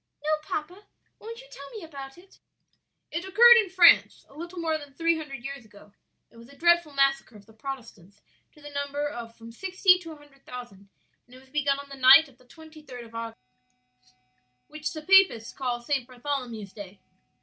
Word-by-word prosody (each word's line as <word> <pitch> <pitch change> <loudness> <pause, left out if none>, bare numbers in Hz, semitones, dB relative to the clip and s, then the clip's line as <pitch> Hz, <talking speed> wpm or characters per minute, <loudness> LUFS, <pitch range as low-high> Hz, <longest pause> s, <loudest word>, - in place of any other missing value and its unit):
"No, 305 - -2
papa; 355 +7 -6 0.3
won't 460 +2 -9
you - - -17
tell 280 0 -11
me 410 - -9
about 275 -3 -10
it?" 375 +2 -20 0.7
"It 335 +3 -3
occurred 470 +5 +7
in 420 -5 +2
France 360 -2 +5
a - - -21
little 340 +4 -9
more 325 -2 -1
than 285 -2 -14
three 335 +1 +1
hundred 275 -6 -8
years 275 -2 -7
ago; 210 -1 -19 0.4
it - - -20
was 235 +2 -15
a 280 - -16
dreadful 345 0 +3
massacre 275 -3 +1
of 205 -1 -15
the 220 - -20
Protestants 220 -6 -9 0.3
to 300 - -20
the 290 - -10
number 285 +1 -3
of 235 -5 -8
from 230 0 -12
sixty 370 - +2
to 330 -3 -10
a - - -9
hundred 290 -2 -21
thousand; 205 -6 -11 0.4
and 250 - -17
it - - -14
was 260 0 -22
begun 285 -1 0
on 280 0 -10
the 275 - -9
night 270 +5 +8
of 260 -3 -22
the 255 - -22
twenty 315 +3 -15
third 250 -5 -10
of 230 - -17
August; 230 0 -6 1.3
which 305 0 -5
the 310 -1 -8
Papists 380 - +4
call 245 -3 -3
St. 270 -1 -2
Bartholomew's 245 -6 -5
Day. 200 -2 -11
280 Hz, 200 wpm, -26 LUFS, 240-330 Hz, 1.3 s, night